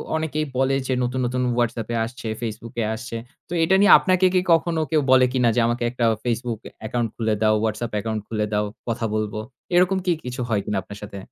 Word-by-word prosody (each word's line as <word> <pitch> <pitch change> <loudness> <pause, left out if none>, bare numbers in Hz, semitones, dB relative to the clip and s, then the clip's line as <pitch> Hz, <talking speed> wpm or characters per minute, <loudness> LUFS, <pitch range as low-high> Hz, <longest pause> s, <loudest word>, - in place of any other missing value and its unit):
অনেকেই 155 -1 -1
বলে 135 +1 +2
যে, 130 - +1
নতুন, 125 +1 -1
নতুন 125 +1 -1 0.2
WhatsApp 120 -2 -1
এ - - 0
আসছে, 125 +1 -8
Facebook 115 0 -5
এ - - +1
আসছে। 120 +1 -7 0.3
তো - - -5
এটা 190 +4 +4
নিয়ে 205 - +6
আপনাকে 185 0 +2
কি 185 - +4
কখনো 165 0 +1
কেউ 155 -2 +3
বলে 130 -1 +7
কিনা 125 -3 +3
যে, - - +3
আমাকে 120 +1 -1
একটা 125 -1 0 0.2
Facebook 120 -2 -2 0.3
account 120 +1 -1
খুলে 110 -2 0
দাও, 110 0 +4
WhatsApp 110 +2 -2
account 110 +1 -3
খুলে 110 -1 -1
দাও 105 0 +1 0.2
কথা 115 0 -1
বলব। 110 -1 -1 0.4
এরকম 180 +2 +4
কি 180 - +3
কিছু 125 +1 -4
হয় 105 -3 +1
কিনা 105 - -1
আপনার 100 +2 -10
সাথে। 100 -1 -8
120 Hz, 210 wpm, -23 LUFS, 110-135 Hz, 0.4 s, বলে